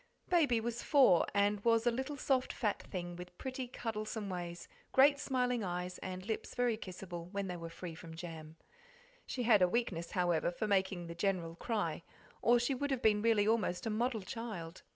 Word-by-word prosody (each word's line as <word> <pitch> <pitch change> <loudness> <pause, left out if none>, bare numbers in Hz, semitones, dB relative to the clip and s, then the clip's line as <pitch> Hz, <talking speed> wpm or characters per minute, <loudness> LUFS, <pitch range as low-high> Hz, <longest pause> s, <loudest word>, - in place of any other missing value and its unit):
Baby 290 -10 +4
was 235 +1 -3
four, 255 - +5
and 200 0 +2
was 230 0 +3
a 240 - +4
little 265 +4 -3
soft 265 -2 +1
fat 210 -5 -1
thing 175 -2 -5
with 180 0 -10
pretty 260 -1 -4
cuddlesome 215 -3 -4
ways, 175 -1 -5 0.3
great 280 +2 +6
smiling 250 -4 0
eyes, 180 0 -3
and 185 0 -6
lips 220 0 -4
very 245 -2 +2
kissable 180 -4 -7
when 200 +1 -3
they 180 -1 -4
were 165 -1 -6
free 170 0 -7
from 160 0 -10
jam. 160 -2 -8 0.7
She 250 - -2
had 220 -4 +5
a 180 - +6
weakness, 180 -7 -1
however, 175 -4 +1
for 180 +5 -3
making 190 -3 +1
the 170 - -6
General 170 -2 -1
cry, 215 +5 -2 0.4
or 240 +1 +5
she 245 +3 +1
would 285 +2 -2
have 265 -3 -1
been 210 -1 +4
really 220 -2 +3
almost 215 -5 +1
a 225 - 0
model 225 -1 0
child. 185 -6 -6
205 Hz, 190 wpm, -34 LUFS, 180-240 Hz, 0.7 s, great